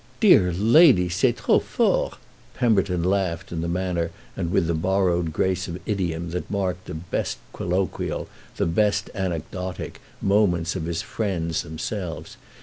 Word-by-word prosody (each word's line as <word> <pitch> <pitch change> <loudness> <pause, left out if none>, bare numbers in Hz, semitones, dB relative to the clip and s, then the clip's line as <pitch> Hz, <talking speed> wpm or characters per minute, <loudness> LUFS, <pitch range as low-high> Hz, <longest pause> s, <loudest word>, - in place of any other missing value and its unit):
"Dear 110 - +6
lady, 110 - +5
c'est 90 - +2
trop - - +3
fort!" - - +1 0.4
Pemberton 95 -7 +2
laughed 90 -1 0
in 85 -1 -3
the 85 - -2
manner 85 -1 -1 0.3
and 85 - -2
with 95 -2 +2
the 85 - 0
borrowed 90 0 +1
grace 95 +3 0
of 85 0 -5
idiom 85 -5 -2
that 90 - -4
marked 95 -3 -2
the - - -5
best 85 +3 -3 0.2
colloquial, 90 +2 -2 0.3
the - - +1
best 100 +5 +1
anecdotic, 90 -1 -4 0.2
moments 90 -4 +2
of 80 - -3
his 85 0 -2
friends 85 -7 -2
themselves. 85 +2 -5
90 Hz, 145 wpm, -24 LUFS, 85-95 Hz, 0.4 s, Dear